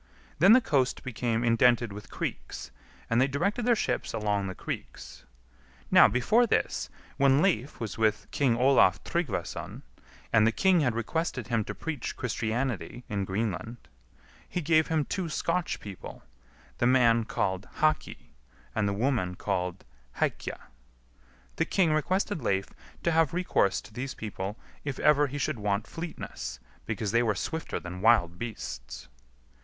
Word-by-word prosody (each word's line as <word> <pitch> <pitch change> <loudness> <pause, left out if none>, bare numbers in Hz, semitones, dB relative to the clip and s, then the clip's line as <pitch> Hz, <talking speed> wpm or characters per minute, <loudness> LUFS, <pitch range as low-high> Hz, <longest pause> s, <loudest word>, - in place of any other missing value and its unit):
Then 190 +7 +8
the 255 - +7
coast 135 - +1
became 120 -2 -1
indented 120 -1 +3
with 105 +1 -10
creeks, - - -5 0.4
and 115 +2 +2
they 130 - +4
directed 195 - -1
their 240 - +5
ships - - -2
along 105 -2 0
the 95 - -5
creeks. - - -7 0.7
Now, - - +8
before 215 - +3
this, - - 0 0.3
when 135 0 +5
Leif 150 - 0
was 110 -3 -5
with 110 -1 +2
King 130 -5 +2
Olaf 125 -7 +4
Tryggvason, 135 - -3 0.5
and 110 -1 +6
the - - +4
king 185 +8 +3
had 125 -7 +1
requested 125 0 -2
him 115 -2 +1
to - - -5
preach 150 -7 -4
Christianity 120 +1 -2
in 100 -2 -1
Greenland, 110 +3 -3 0.7
he 180 - -2
gave 160 -1 +3
him 155 -3 +1
two 185 -4 -3
Scotch 170 +3 -1
people, 100 -3 -9 0.6
the 120 - +3
man 120 -3 +4
called 95 -2 -2
Haki, 155 0 -1 0.4
and 105 -2 +1
the - - 0
woman 105 -5 0
called 90 +1 -3 0.3
Hækja. - - -2 1.0
The - - +2
king 175 -5 +2
requested 185 +3 0
Leif 95 -4 0 0.3
to 170 - +2
have 165 -1 +2
recourse 175 - +2
to - - -15
these 130 +4 -4
people 105 -1 -5 0.3
if 140 -3 -4
ever 145 -1 +4
he 140 +2 -5
should 140 -3 -1
want 105 0 0
fleetness, 165 - -6 0.3
because 105 -3 -2
they 115 +1 +4
were 110 -4 +1
swifter 160 - -3
than 90 +1 -7
wild 90 -6 +4
beasts. - - -6
120 Hz, 150 wpm, -28 LUFS, 105-155 Hz, 1.0 s, Then